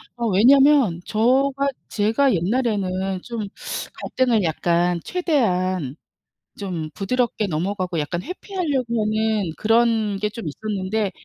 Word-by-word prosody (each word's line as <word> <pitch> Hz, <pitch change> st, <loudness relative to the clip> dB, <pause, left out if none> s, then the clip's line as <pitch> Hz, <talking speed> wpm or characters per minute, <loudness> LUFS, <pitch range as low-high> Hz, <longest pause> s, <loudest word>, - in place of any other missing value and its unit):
어 235 Hz, -1 st, -2 dB
왜냐면 250 Hz, -, +5 dB
저가 270 Hz, +5 st, +2 dB, 0.2 s
제가 225 Hz, +5 st, +2 dB
옛날에는 190 Hz, -2 st, -1 dB
좀 230 Hz, -4 st, -5 dB, 0.5 s
갈등을 240 Hz, -6 st, 0 dB
약간 170 Hz, +1 st, +1 dB
최대한 185 Hz, -, 0 dB, 0.6 s
좀 175 Hz, -6 st, -4 dB
부드럽게 230 Hz, 0 st, -1 dB
넘어가고 180 Hz, +1 st, -2 dB
약간 170 Hz, +4 st, -2 dB
회피하려고 290 Hz, -, -2 dB
하는 215 Hz, -4 st, 0 dB
그런 225 Hz, -2 st, +2 dB
게 210 Hz, +1 st, 0 dB
좀 225 Hz, -4 st, -8 dB
있었는데 200 Hz, +3 st, -2 dB
215 Hz, 250 characters per minute, -22 LUFS, 185-245 Hz, 0.6 s, 왜냐면